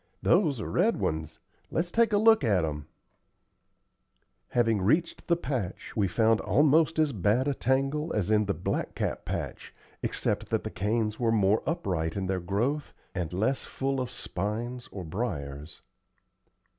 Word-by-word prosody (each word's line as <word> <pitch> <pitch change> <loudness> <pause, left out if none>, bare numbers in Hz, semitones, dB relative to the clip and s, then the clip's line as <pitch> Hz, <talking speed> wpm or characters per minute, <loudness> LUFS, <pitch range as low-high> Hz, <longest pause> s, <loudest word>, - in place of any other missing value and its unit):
"Those 160 - +3
are 105 - -4
red - - +2
ones. 80 -1 -2 0.3
Let's 170 +2 -1
take 230 -1 +3
a 205 - +4
look 220 -3 +5
at 100 -8 +3
'em." 75 -2 -5 1.6
Having 115 - +2
reached 160 - +1
the 170 - +4
patch, 130 - -4
we 105 -3 +2
found 110 +4 +3
almost 155 +3 +3
as 155 -3 +2
bad 110 +7 +2
a 145 - +2
tangle 135 +5 0
as 105 -1 0
in 105 0 +4
the 100 - -1
blackcap 85 - -2
patch, - - -5 0.3
except - - -1
that - - 0
the - - -5
canes 105 +2 -1
were 115 -2 +2
more 105 -1 +3
upright 90 - -1
in 100 -1 -2
their 95 0 -1
growth 115 - -1 0.2
and 90 -3 -3
less 110 +9 0
full 135 0 -2
of 125 - -3
spines 120 +3 -4
or 95 - -6
briers. 75 - -5
115 Hz, 155 wpm, -28 LUFS, 95-140 Hz, 1.6 s, look